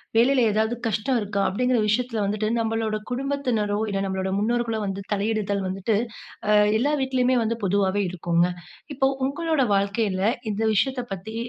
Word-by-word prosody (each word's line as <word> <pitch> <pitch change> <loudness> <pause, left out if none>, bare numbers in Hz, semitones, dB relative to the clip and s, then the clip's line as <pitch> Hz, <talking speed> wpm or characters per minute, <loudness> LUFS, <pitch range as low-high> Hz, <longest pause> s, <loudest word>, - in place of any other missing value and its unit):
வேலையில 250 +3 +4
ஏதாவது 220 +3 +1
கஷ்டம் 225 +4 0
இருக்கா? 200 -1 -2
அப்படிங்கிற 250 +5 +1
விஷயத்தில 230 0 0
வந்துட்டு, 210 +1 -1
நம்மளோட 225 -1 -1
குடும்பத்தினரோ, 250 -6 -1
இல்ல 195 - -1
நம்மளோட 190 0 -2
முன்னோர்களோ 230 +1 0
வந்து 195 0 -3
தலையிடுதல் 205 -1 -1
வந்துட்டு, 195 +3 -1 0.5
ஆ, - - +4 0.3
எல்லா 285 +6 +1
வீட்டிலயுமே 260 -1 +2
வந்து 230 +1 0
பொதுவாவே 195 +1 +1
இருக்குங்க. 175 0 +1 0.5
இப்போ 270 0 +3 0.2
உங்களோட 315 0 0
வாழ்க்கையில, 200 -1 0 0.3
இந்த 210 +2 -3
விஷயத்தப் 250 +1 0
பத்தி, 200 +4 -7
220 Hz, 140 wpm, -24 LUFS, 200-250 Hz, 0.5 s, வேலையில